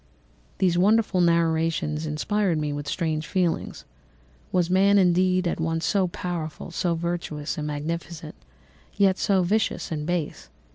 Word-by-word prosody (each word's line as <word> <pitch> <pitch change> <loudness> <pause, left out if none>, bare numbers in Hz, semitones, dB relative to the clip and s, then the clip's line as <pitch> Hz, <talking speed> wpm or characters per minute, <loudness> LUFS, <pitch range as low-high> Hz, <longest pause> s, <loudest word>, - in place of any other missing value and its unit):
"These 175 -2 +2
wonderful 205 -1 +3
narrations 165 -2 +1
inspired 180 +4 0
me 150 -1 -2
with 145 0 -5
strange 155 -1 -2
feelings. 180 -4 -1 0.7
Was 180 -2 +2
man, 195 +3 +4
indeed, 185 0 +3
at 170 - -2
once 165 0 -1
so 195 -3 +2
powerful, 170 -2 -5
so 170 0 0
virtuous 165 -3 -3
and 150 -1 -4
magnificent, 160 +2 -5 0.6
yet 195 -2 +3
so 190 -2 +2
vicious 210 +1 0
and 150 -1 -3
base? 175 -4 -3
170 Hz, 135 wpm, -25 LUFS, 160-185 Hz, 0.7 s, man